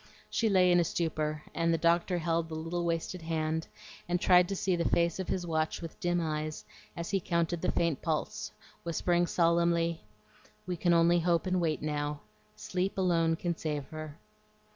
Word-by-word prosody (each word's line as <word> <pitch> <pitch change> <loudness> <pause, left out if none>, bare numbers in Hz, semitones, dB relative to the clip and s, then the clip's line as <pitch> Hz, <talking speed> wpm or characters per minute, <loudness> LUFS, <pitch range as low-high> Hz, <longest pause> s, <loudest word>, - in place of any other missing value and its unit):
She 225 - +1
lay 185 -2 +5
in 175 - +5
a - - +4
stupor, 155 -2 -2
and 165 0 +1
the 165 - +2
doctor 170 +2 +2
held 165 0 0
the 160 - -5
little 165 +2 -3
wasted 170 +1 -2
hand, 160 0 -2 0.4
and 175 0 +1
tried 180 -1 +5
to 195 - -1
see 185 -1 0
the 170 -1 0
face 170 +1 +1
of 190 - -3
his 180 -2 -2
watch 160 -1 -1
with 165 -2 -8
dim 175 0 +1
eyes 155 -1 -3 0.3
as 170 +3 -4
he 195 - +2
counted 170 -1 -1
the - - +1
faint 165 -5 0
pulse, 160 -2 -2 0.3
whispering 175 +1 +1
solemnly, 170 -1 +2 0.6
"We 180 -1 -2
can 175 0 +2
only 170 +1 +5
hope 170 +1 +1
and 185 -1 +1
wait 155 -3 -1
now. 145 -1 -2 0.3
Sleep 185 +2 -2
alone 165 -3 +2
can 170 +1 -2
save 150 -3 -3
her." 155 -2 -7
170 Hz, 185 wpm, -30 LUFS, 160-175 Hz, 0.6 s, lay